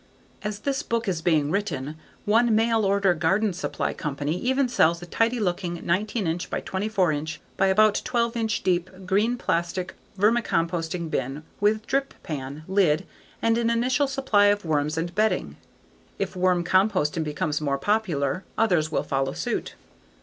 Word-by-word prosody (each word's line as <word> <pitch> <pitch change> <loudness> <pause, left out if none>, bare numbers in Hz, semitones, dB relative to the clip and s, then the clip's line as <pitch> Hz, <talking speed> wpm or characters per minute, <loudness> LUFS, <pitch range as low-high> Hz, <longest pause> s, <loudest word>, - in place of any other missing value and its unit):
As 210 0 -4
this 280 0 -1
book 230 -5 -2
is 175 -4 -1
being 155 -3 +2
written, 165 -7 -2 0.3
one 225 +2 +4
mail 225 -1 +2
order 195 -1 +3
garden 190 +5 +1
supply 185 - -2
company 145 +1 -3
even 260 +7 +1
sells 170 -8 +3
a - - -6
tidy 230 +7 +1
looking 175 -3 -2
19" 185 -1 0
by - - -2
24" 190 -3 0 0.4
by 195 - +2
about 210 +2 +4
12" 235 -2 0
deep 180 -1 +1 0.2
green 210 +6 +1
plastic 175 -2 -1 0.2
vermicomposting 170 -6 0
bin 135 +4 -2 0.2
with 215 +2 +2
drip 275 +3 -1
pan, 145 0 -6
lid, 190 -3 +2 0.4
and 230 0 +3
an 230 -1 +1
initial 250 +4 +2
supply 265 -7 +2
of 205 -1 +2
worms 150 0 0
and 170 +2 -2
bedding. 180 - 0 0.6
If - - -3
worm 180 -1 +2
composting 185 -4 +2
becomes 150 0 -2
more 140 -2 0
popular, 180 -3 0
others 180 -9 +2
will - - 0
follow 135 0 -1
suit. - - -3
190 Hz, 150 wpm, -25 LUFS, 160-220 Hz, 0.6 s, one